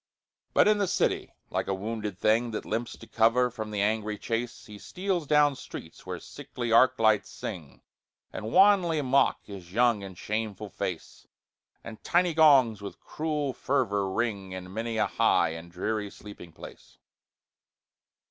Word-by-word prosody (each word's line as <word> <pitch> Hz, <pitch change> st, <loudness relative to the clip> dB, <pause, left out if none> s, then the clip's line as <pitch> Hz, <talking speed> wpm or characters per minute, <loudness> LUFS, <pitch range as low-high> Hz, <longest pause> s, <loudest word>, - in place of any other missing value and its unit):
But -, -, +6 dB
in 210 Hz, 0 st, +4 dB
the 200 Hz, -, +1 dB
city, -, -, -1 dB, 0.2 s
like -, -, -1 dB
a 95 Hz, -, 0 dB
wounded 105 Hz, -1 st, -4 dB
thing 115 Hz, +4 st, +2 dB
That 110 Hz, -, -5 dB
limps 115 Hz, +2 st, -3 dB
to -, -, -12 dB
cover 120 Hz, +2 st, +2 dB
from 110 Hz, -2 st, -6 dB
the 105 Hz, -1 st, -2 dB
angry 105 Hz, 0 st, -1 dB
chase, 115 Hz, +2 st, -4 dB
He 105 Hz, -3 st, -11 dB
steals 185 Hz, -, -3 dB
down 150 Hz, -1 st, +4 dB
streets -, -, -10 dB
where -, -, -4 dB
sickly 120 Hz, -2 st, -6 dB
arc 125 Hz, +3 st, +5 dB
lights 110 Hz, -2 st, +3 dB
sing, 85 Hz, -9 st, -8 dB, 0.5 s
And 110 Hz, -, -5 dB
wanly 190 Hz, -, +5 dB
mock 135 Hz, +1 st, +2 dB
his 95 Hz, -4 st, -10 dB
young 120 Hz, -2 st, +3 dB
and 95 Hz, -2 st, -9 dB
shameful 105 Hz, -1 st, -4 dB
face; 90 Hz, -3 st, -6 dB, 0.6 s
And 115 Hz, -1 st, -10 dB
tiny 175 Hz, 0 st, +2 dB
gongs 135 Hz, -9 st, +5 dB
with 100 Hz, -, -8 dB
cruel 150 Hz, -3 st, -3 dB
fervor 105 Hz, -9 st, 0 dB
ring 100 Hz, -3 st, -2 dB
In 95 Hz, 0 st, -8 dB
many 115 Hz, +1 st, -3 dB
a -, -, +3 dB
high -, -, +2 dB
and 80 Hz, +1 st, -8 dB
dreary 105 Hz, +3 st, -2 dB
sleeping 100 Hz, -5 st, -12 dB
place. 80 Hz, -, -13 dB
110 Hz, 155 wpm, -28 LUFS, 100-130 Hz, 0.6 s, But